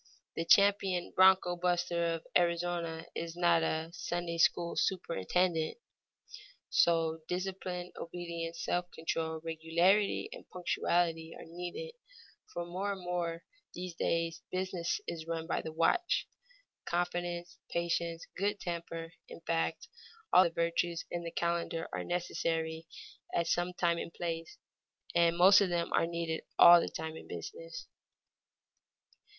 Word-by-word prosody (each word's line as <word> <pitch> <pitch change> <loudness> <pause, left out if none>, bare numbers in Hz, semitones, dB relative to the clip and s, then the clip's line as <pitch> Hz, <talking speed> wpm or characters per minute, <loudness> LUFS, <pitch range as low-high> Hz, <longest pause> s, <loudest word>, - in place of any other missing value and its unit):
The 165 - -2
champion 195 -1 +4
broncho 185 -1 +6
buster 175 -1 +1
of 165 - -9
Arizona 170 -1 +1
is 165 0 -5
not 170 -1 +4
a 160 0 -1
Sunday 175 -1 -3
school 170 +1 +3
superintendent. 175 - 0 0.9
So, 165 -1 +3
discipline, 180 -1 -3
obedience, 170 -1 -5
self 180 0 -1
control, 160 -1 -2
regularity, 170 - +2
and - - -12
punctuality 170 -2 0
are - - -10
needed, 180 - -6 0.6
for 175 - -4
more 190 +4 -2
and 190 - -8
more 175 -1 -1
in 165 - -11 0.3
these 180 0 -5
days 165 0 -1
business 185 -2 -1
is 160 -1 -5
run 165 -1 -2
by 165 - -1
the 160 - -6
watch; 170 - +2 0.6
confidence, 175 0 -2
patience, 170 -1 -1
good 205 +1 0
temper, 165 -1 -5 0.2
in - - -10
fact 165 0 -1 0.5
all 185 - +8
the - - +2
virtues 170 0 -1
in 175 0 -3
the 170 - -4
calendar 170 -1 -1
are - - -2
necessary 165 -2 -2 0.5
at 170 - +2
some 175 +2 +1
time 170 -1 +1
and - - -5
place, 165 -1 -4 0.6
and 170 0 +3
most 195 +3 +8
of 195 - +2
them 170 -1 -1
are 165 - +3
needed 170 -1 -3
all 175 0 +10
the - - -2
time 160 0 -5
in - - -10
business. - - -7
170 Hz, 135 wpm, -32 LUFS, 165-180 Hz, 0.9 s, all